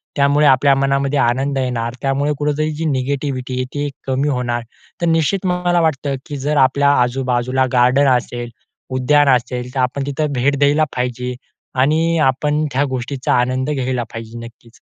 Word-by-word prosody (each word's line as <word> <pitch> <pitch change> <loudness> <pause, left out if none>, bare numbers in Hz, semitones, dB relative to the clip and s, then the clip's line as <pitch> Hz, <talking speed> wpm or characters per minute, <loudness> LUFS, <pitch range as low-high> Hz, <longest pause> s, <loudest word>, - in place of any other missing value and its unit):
त्यामुळे 145 +1 +3
आपल्या 135 +1 +5
मनामध्ये 135 +1 +1
आनंद 135 +3 +1
येणार 125 -2 -2
त्यामुळे 140 +2 0
कुठेतरी 150 +1 0
जी 160 +2 -3
निगेटिविटी 135 -2 -2
आहे 130 - -1
ती 145 0 -2 0.2
कमी 135 +2 0
होणार. 120 -3 -1 0.4
तर 170 - +1
निश्चित 165 +4 +1
मला 180 -1 +1
वाटतं, 140 -3 0
की 145 - -6
जर 145 +2 -1
आपल्या 140 +2 +3
आजूबाजूला 125 +1 0
गार्डन 125 +3 +4
असेल, 120 0 -6 0.5
उद्यान 145 +2 +3
असेल. 125 0 -4
तर - - -1
आपण 135 +2 -1
तिथं 145 +1 -2
भेट 140 +2 +1
द्यायला 145 +2 +3
पाहिजे 125 0 -2 0.5
आणि 165 +4 +2
आपण 150 +3 0
त्या 135 +2 +2
गोष्टीचा 130 +1 -2
आनंद 130 +2 -1
घ्यायला 130 -3 -1
पाहिजे 115 0 -8
नक्कीच. 115 0 -16
135 Hz, 155 wpm, -18 LUFS, 125-145 Hz, 0.5 s, आपल्या